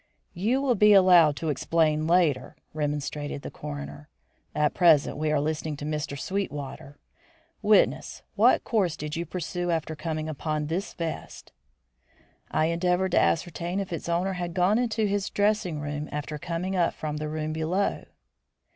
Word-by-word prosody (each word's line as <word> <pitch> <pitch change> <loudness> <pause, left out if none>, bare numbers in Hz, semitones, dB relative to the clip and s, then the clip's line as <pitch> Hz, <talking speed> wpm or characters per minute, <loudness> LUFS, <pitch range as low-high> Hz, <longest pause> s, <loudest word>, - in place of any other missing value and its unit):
"You 230 +10 0
will 265 -3 +3
be 210 -1 +6
allowed 180 -6 +6
to 155 +3 -3
explain 155 +1 +1
later," 165 -7 +2 0.2
remonstrated 145 -1 -3
the - - -6
coroner. 70 +1 -8 0.5
"At 150 0 +2
present 165 -5 +4
we 155 +1 -1
are 150 - +2
listening 155 0 -2
to 145 - -6
Mr. 150 -2 -3
Sweetwater. 145 -6 -5 0.6
Witness, 210 0 +2
what - - +4
course 185 -8 0
did 150 0 -5
you 170 0 -3
pursue 175 +1 -3
after 160 -2 -1
coming 155 0 -3
upon 155 0 -2
this 170 +6 -3
vest?" 165 -2 -6 1.0
"I 155 - +1
endeavoured 180 +3 +1
to - - +4
ascertain 170 - 0
if 195 -3 -4
its 165 - -5
owner 180 +3 0
had 175 -2 -4
gone 190 +5 +3
into 225 -3 0
his 200 -1 -1
dressing 205 -6 0
room 145 +1 -4
after 150 +1 -4
coming 180 +4 -3
up 175 -2 +1
from 150 -1 -4
the 150 0 -4
room 155 0 -3
below." 165 +5 -1
160 Hz, 155 wpm, -26 LUFS, 150-185 Hz, 1.0 s, be